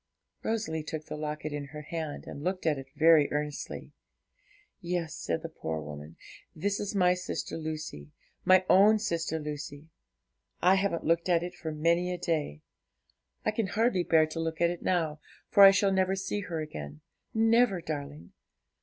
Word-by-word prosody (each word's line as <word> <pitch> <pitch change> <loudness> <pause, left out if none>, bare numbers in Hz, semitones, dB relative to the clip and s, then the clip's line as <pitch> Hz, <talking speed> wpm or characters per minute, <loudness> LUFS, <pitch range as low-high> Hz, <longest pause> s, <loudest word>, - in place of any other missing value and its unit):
Rosalie 215 -8 -2
took 155 0 -6
the - - -6
locket 150 0 -4
in 145 -1 -4
her 150 +1 -9
hand, 155 -1 -5
and 145 - -8
looked 185 +1 -2
at 150 -4 +2
it 135 - -9
very 155 -1 +5
earnestly. 150 0 -4 0.9
'Yes,' 175 -3 -3
said 85 - -3
the - - -3
poor 80 0 -4
woman, 75 +1 -9 0.4
'that 160 - -8
is 205 0 -3
my 180 -2 +4
sister 180 0 -4
Lucy 155 - -6 0.3
my 185 0 +5
own 210 +3 +6
sister 170 -6 -2
Lucy. 150 0 -7 0.7
I 185 - +5
haven't 195 -3 0
looked 170 +2 +1
at 170 -1 +3
it 175 - -5
for 160 - -6
many 170 +4 +1
a 180 - -2
day; 155 - -2 0.8
I 215 - +2
can 215 -1 -1
hardly 220 -1 +1
bear 160 -2 +4
to 155 +1 -6
look 165 0 -3
at 170 0 +3
it 175 - -6
now, 160 -4 0 0.3
for 200 - +5
I 195 - +12
shall 195 0 +3
never 190 0 +2
see 195 +2 -3
her 175 -5 -4
again 75 - -7 0.3
never, 225 -3 +4
darling! 145 - -6
165 Hz, 170 wpm, -29 LUFS, 150-185 Hz, 0.9 s, I